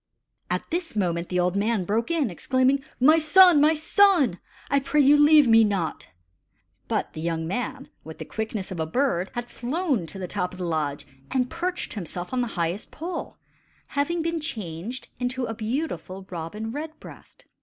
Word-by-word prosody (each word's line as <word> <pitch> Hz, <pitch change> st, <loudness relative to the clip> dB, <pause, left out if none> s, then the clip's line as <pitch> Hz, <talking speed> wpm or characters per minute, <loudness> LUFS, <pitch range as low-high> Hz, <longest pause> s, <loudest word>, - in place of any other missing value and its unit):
At -, -, -2 dB
this 335 Hz, -5 st, -3 dB
moment 170 Hz, -4 st, -1 dB
the 180 Hz, -, 0 dB
old 180 Hz, +1 st, +1 dB
man 205 Hz, -1 st, 0 dB
broke 220 Hz, +5 st, 0 dB
in, 310 Hz, -, +1 dB
exclaiming: 260 Hz, +8 st, +1 dB, 0.2 s
"My 310 Hz, +6 st, +6 dB
son! 340 Hz, 0 st, +7 dB
my 310 Hz, +2 st, +5 dB
son! 315 Hz, -, +3 dB, 0.3 s
I 280 Hz, -, +2 dB
pray 285 Hz, +2 st, 0 dB
you 285 Hz, +1 st, +7 dB
leave 295 Hz, -1 st, +6 dB
me 225 Hz, -1 st, +7 dB
not!" 195 Hz, -6 st, -2 dB, 0.8 s
But -, -, -2 dB
the 155 Hz, -, -6 dB
young 165 Hz, -1 st, -2 dB
man, 250 Hz, +8 st, -4 dB, 0.2 s
with 160 Hz, 0 st, -10 dB
the -, -, -7 dB
quickness 220 Hz, -3 st, -4 dB
of 180 Hz, -, -5 dB
a 160 Hz, -, -1 dB
bird, 195 Hz, -, 0 dB
had 240 Hz, 0 st, -3 dB
flown 255 Hz, -, -2 dB
to 160 Hz, -, -10 dB
the 185 Hz, -1 st, -4 dB
top 180 Hz, +1 st, -3 dB
of -, -, -10 dB
the 180 Hz, -, -4 dB
lodge 150 Hz, -4 st, -2 dB, 0.2 s
and 250 Hz, -1 st, 0 dB
perched 350 Hz, +2 st, -3 dB
himself 180 Hz, 0 st, -5 dB
on 255 Hz, -, +1 dB
the 240 Hz, -, -1 dB
highest 170 Hz, +4 st, -2 dB
pole, 340 Hz, +2 st, -6 dB, 0.5 s
having 320 Hz, +4 st, -1 dB
been 335 Hz, 0 st, -1 dB
changed 215 Hz, -, -5 dB
into 250 Hz, 0 st, -2 dB
a 225 Hz, -, -4 dB
beautiful 220 Hz, -, -4 dB
robin 185 Hz, +6 st, -5 dB
red 310 Hz, +4 st, -6 dB
breast. -, -, -14 dB
240 Hz, 180 wpm, -25 LUFS, 180-295 Hz, 0.8 s, son